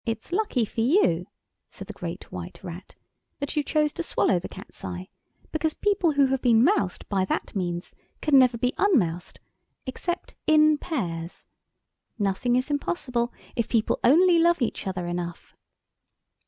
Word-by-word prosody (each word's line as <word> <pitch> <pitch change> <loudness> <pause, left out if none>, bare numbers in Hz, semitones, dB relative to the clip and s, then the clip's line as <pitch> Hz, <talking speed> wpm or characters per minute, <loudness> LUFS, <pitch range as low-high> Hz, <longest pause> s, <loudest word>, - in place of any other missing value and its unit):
] - - -59
"It's 225 - -15
lucky 360 - +1
for 225 - -4
you," 225 - +3 0.4
said - - -9
the - - -8
Great - - -7
White - - -7
Rat, - - -9 0.4
"that 285 +1 -4
you 300 - +3
chose 300 0 +1
to - - -4
swallow 195 - +1
the - - -7
Cat's - - -12
eye, 90 0 -6 0.4
because 315 0 -1
people 395 -6 +1
who 280 -1 +4
have 265 0 0
been 235 -2 +5
moused 260 - +1
by 195 -2 +1
that - - -3
means 175 -2 -3 0.3
can 290 -3 +5
never 250 -2 +4
be 250 +2 0
un 405 -5 +4
moused 175 -3 -2 0.5
except 345 +7 -4
in 305 -1 +5
pairs. 170 - -4 0.7
Nothing 205 +4 +1
is 255 +4 0
impossible 250 -5 -1 0.2
if 235 - -1
people 225 -2 +1
only 340 +6 +6
love 340 0 +4
each 240 -5 -2
other 185 -2 -3
enough." 175 0 -5
250 Hz, 165 wpm, -26 LUFS, 190-310 Hz, 0.7 s, only